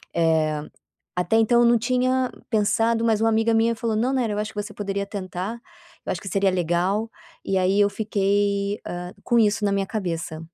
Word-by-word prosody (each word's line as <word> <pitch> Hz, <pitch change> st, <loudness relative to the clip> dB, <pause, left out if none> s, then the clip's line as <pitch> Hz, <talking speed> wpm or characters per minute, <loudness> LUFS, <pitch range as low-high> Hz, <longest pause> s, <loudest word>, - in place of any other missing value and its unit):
eh, 160 Hz, -2 st, +2 dB, 0.6 s
até 180 Hz, +5 st, +1 dB
então 225 Hz, +2 st, +4 dB
eu -, -, +5 dB
não 235 Hz, 0 st, +5 dB
tinha 255 Hz, +2 st, +1 dB, 0.2 s
pensado, 225 Hz, +1 st, +1 dB
mas 220 Hz, -2 st, +2 dB
uma 225 Hz, -, +3 dB
amiga 225 Hz, +1 st, +2 dB
minha 225 Hz, +1 st, +3 dB
falou: 225 Hz, -1 st, -2 dB
"Não, 245 Hz, +5 st, +1 dB
Nayara, 240 Hz, -5 st, 0 dB
eu -, -, -3 dB
acho 210 Hz, +1 st, -3 dB
que 205 Hz, -, -2 dB
você 205 Hz, -, -9 dB
poderia 200 Hz, -1 st, -3 dB
tentar, 195 Hz, +3 st, -5 dB, 0.5 s
eu -, -, 0 dB
acho -, -, -5 dB
que 195 Hz, -, -7 dB
seria 195 Hz, 0 st, +2 dB
legal". 185 Hz, +5 st, 0 dB, 0.3 s
E 195 Hz, -, 0 dB
aí 190 Hz, +2 st, +2 dB
eu 205 Hz, 0 st, +4 dB
fiquei, 200 Hz, -1 st, 0 dB
ah, 180 Hz, 0 st, -5 dB
com 240 Hz, -, +1 dB
isso 215 Hz, -1 st, +2 dB
na 200 Hz, -, +2 dB
minha 195 Hz, -1 st, 0 dB
cabeça. 170 Hz, -6 st, -4 dB
205 Hz, 200 wpm, -23 LUFS, 190-225 Hz, 0.6 s, eu